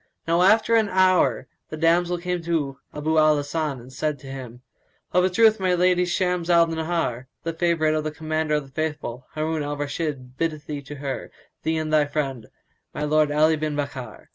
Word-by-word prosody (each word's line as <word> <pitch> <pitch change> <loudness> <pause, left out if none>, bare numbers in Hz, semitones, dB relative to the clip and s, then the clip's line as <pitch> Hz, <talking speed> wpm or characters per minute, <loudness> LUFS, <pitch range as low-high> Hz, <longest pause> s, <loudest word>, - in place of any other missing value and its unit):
Now 170 +1 +3
after 215 +5 +4
an 220 -2 +4
hour 185 -1 +3 0.2
the 155 - -6
damsel 170 +2 +2
came 180 0 -3
to 155 -5 -2
Abu 155 +2 +1
al 155 -1 +5
Hasan 145 -1 -2
and 125 +2 -13
said 150 +1 -1
to 135 - -13
him, 125 -2 -9 0.5
"Of 180 - +4
a 185 - +3
truth 220 +3 +4
my 185 -1 +2
lady 180 0 +3
Shams 180 -1 -1
al 170 -1 +6
Nahár, 160 -6 -2 0.2
the 165 - -2
favourite 165 -2 +1
of 155 0 0
the 155 - -1
Commander 155 0 -1
of 150 - 0
the 135 - -17
Faithful, 135 -4 -4
Harun 155 0 -1
al 145 0 -3
Rashid, 145 -3 -4
biddeth 155 -3 -2
thee 145 -1 -5
to 140 +2 -9
her, 135 -1 -5 0.3
thee 160 0 0
and 155 -1 -2
thy 150 -1 +5
friend, 135 -7 -3 0.5
my - - -2
lord 150 0 +2
Ali 155 +2 +4
bin 155 -1 -2
Bakkar." 140 -5 -6
155 Hz, 195 wpm, -24 LUFS, 145-170 Hz, 0.5 s, al